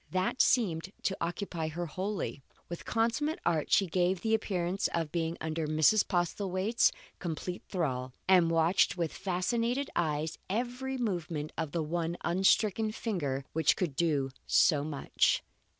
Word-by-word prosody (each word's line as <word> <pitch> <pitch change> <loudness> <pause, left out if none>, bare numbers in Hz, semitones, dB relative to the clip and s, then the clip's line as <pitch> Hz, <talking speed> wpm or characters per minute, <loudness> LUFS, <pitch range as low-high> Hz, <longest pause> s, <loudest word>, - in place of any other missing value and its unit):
That 185 +7 +1
seemed 190 -7 +2
to 190 - 0
occupy 170 -1 -3
her 170 +2 -3
wholly. 185 -3 -3 0.3
With 170 - -6
consummate 235 +7 0
art 160 -3 +1
she 195 - +5
gave 180 +1 +1
the 225 -1 0
appearance 190 -3 0
of 165 -3 -1
being 165 -1 -1
under 160 0 -2
Mrs. 155 +7 +4
Postlethwaite's 185 +4 +1 0.3
complete 175 +1 -4
thrall, 130 -8 -2 0.2
and 180 -3 +5
watched 165 +3 +3
with 170 -3 -1
fascinated 230 +8 -1
eyes 155 -1 -1
every 250 +5 -2
movement 170 -9 -2
of 155 - -3
the 165 0 -1
one 170 +2 -2
unstricken 195 +4 +2
finger 145 - -2
which 160 0 +3
could 170 -7 -2
do 145 -4 +1 0.2
so 145 -2 +4
much. 145 -2 +1
175 Hz, 140 wpm, -31 LUFS, 160-200 Hz, 0.3 s, she